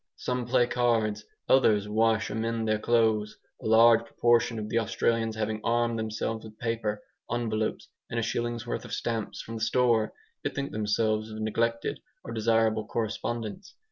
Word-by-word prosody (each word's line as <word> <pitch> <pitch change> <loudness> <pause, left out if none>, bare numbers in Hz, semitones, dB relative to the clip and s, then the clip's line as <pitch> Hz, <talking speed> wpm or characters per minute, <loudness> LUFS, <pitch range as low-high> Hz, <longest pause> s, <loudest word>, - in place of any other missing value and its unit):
Some 125 -1 -3
play 125 0 +4
cards, 115 -4 +1 0.2
others 105 -6 +4
wash 110 +1 +2
or - - -3
mend 115 0 -1
their 110 0 +1
clothes. 110 -2 +2 0.2
A - - -4
large 115 +1 +6
proportion 115 0 +2
of 105 -1 -4
the 115 - +1
Australians 115 0 0
having 110 0 -2
armed 120 0 +1
themselves 110 0 -3
with 110 -1 -12
paper, 110 -3 -2 0.3
envelopes, 110 -2 -1 0.2
and 115 - -1
a - - 0
shilling's 120 +1 -2
worth 120 - -3
of - - -8
stamps 115 -3 -3
from 115 0 -6
the - - -7
store, 115 -1 +2 0.3
bethink 140 0 -3
themselves 110 +1 0
of 110 0 -7
neglected 115 +2 -1 0.2
or 115 - -6
desirable 110 -1 +2
correspondents. 115 - -4
115 Hz, 160 wpm, -28 LUFS, 110-115 Hz, 0.3 s, large